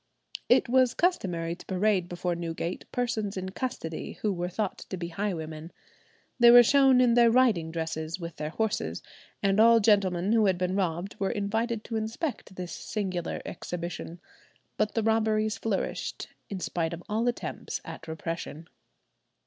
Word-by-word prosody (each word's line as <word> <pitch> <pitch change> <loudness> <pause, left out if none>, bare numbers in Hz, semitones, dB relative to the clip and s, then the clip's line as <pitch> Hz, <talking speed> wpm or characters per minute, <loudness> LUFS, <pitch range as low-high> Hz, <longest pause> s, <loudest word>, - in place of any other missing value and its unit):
It - - +5
was 255 0 +3
customary 180 - 0
to 175 - -11
parade 190 -1 +1
before 175 0 -2
Newgate 170 +1 -4
persons 220 -5 -2
in 185 0 -3
custody 190 -7 -4
who 210 -2 +2
were 175 0 -3
thought 200 +1 -3
to 190 - -6
be 170 -1 -4
highwaymen. 165 -4 -4 0.7
They 240 0 +8
were 240 0 +10
shown 270 0 +5
in 245 -2 +5
their 235 0 +6
riding 225 -9 +3
dresses 160 +1 -3
with 170 -2 -7
their 150 0 -3
horses, 220 +5 -2 0.4
and 195 +1 +3
all 230 +1 +7
gentlemen 195 -3 +3
who 220 -3 +4
had 185 -2 +2
been 180 +1 -1
robbed 180 0 -2
were 195 - 0
invited 220 +2 -1
to 225 - -3
inspect 220 - -4
this 180 -2 -6
singular 185 -1 -3
exhibition. 170 0 -6 0.6
But 215 - 0
the 225 - +1
robberies 220 0 +1
flourished 210 -4 -3 0.2
in 195 - -4
spite 170 -2 -2
of 170 +1 -7
all 220 +3 0
attempts 240 - -3
at 165 - -9
repression. 160 0 -5
195 Hz, 155 wpm, -28 LUFS, 170-225 Hz, 0.7 s, were